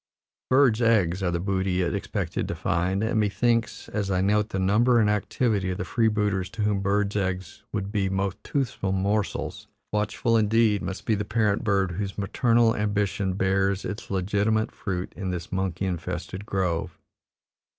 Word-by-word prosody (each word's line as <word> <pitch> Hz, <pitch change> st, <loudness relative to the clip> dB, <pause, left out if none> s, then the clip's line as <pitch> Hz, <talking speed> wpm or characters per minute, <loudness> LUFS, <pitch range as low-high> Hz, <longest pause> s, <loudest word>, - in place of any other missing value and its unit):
Birds' 130 Hz, -4 st, +4 dB
eggs 100 Hz, -6 st, +3 dB
are 95 Hz, -, +1 dB
the 85 Hz, 0 st, -1 dB
booty 95 Hz, 0 st, 0 dB
it 85 Hz, -, -1 dB
expected 100 Hz, -3 st, -2 dB
to -, -, -3 dB
find, 95 Hz, +2 st, 0 dB
and, 110 Hz, 0 st, +1 dB
me 105 Hz, -1 st, +2 dB
thinks, 115 Hz, +2 st, 0 dB
as 100 Hz, -2 st, -2 dB
I 95 Hz, -1 st, +1 dB
note 105 Hz, +3 st, +2 dB
the 95 Hz, -, -3 dB
number 110 Hz, +6 st, +3 dB
and 110 Hz, -, +4 dB
activity 105 Hz, -1 st, 0 dB
of 90 Hz, -, -2 dB
the -, -, -3 dB
freebooters 105 Hz, -5 st, +1 dB
to 110 Hz, -, -2 dB
whom 105 Hz, -1 st, +1 dB
birds' 100 Hz, +1 st, 0 dB
eggs 95 Hz, -3 st, -2 dB
would 100 Hz, -1 st, -3 dB
be 100 Hz, -3 st, 0 dB
most 95 Hz, +1 st, -2 dB
toothsome 110 Hz, -8 st, -1 dB
morsels, 100 Hz, +2 st, -1 dB, 0.2 s
watchful 105 Hz, +2 st, +1 dB
indeed 110 Hz, -1 st, +3 dB
must 95 Hz, -, -5 dB
be 110 Hz, -, +2 dB
the 105 Hz, -1 st, 0 dB
parent 105 Hz, +1 st, +1 dB
bird 100 Hz, -4 st, +1 dB
whose 100 Hz, +2 st, -4 dB
maternal 115 Hz, +3 st, +2 dB
ambition 100 Hz, -2 st, 0 dB
bears 95 Hz, +1 st, +1 dB
its 105 Hz, +1 st, -5 dB
legitimate 105 Hz, +3 st, +1 dB
fruit 95 Hz, -2 st, -4 dB
in 95 Hz, -, -4 dB
this 90 Hz, -2 st, -4 dB
monkey 95 Hz, -1 st, -1 dB
infested 90 Hz, +2 st, -4 dB
grove. 90 Hz, -4 st, -1 dB
100 Hz, 170 wpm, -26 LUFS, 95-105 Hz, 0.2 s, Birds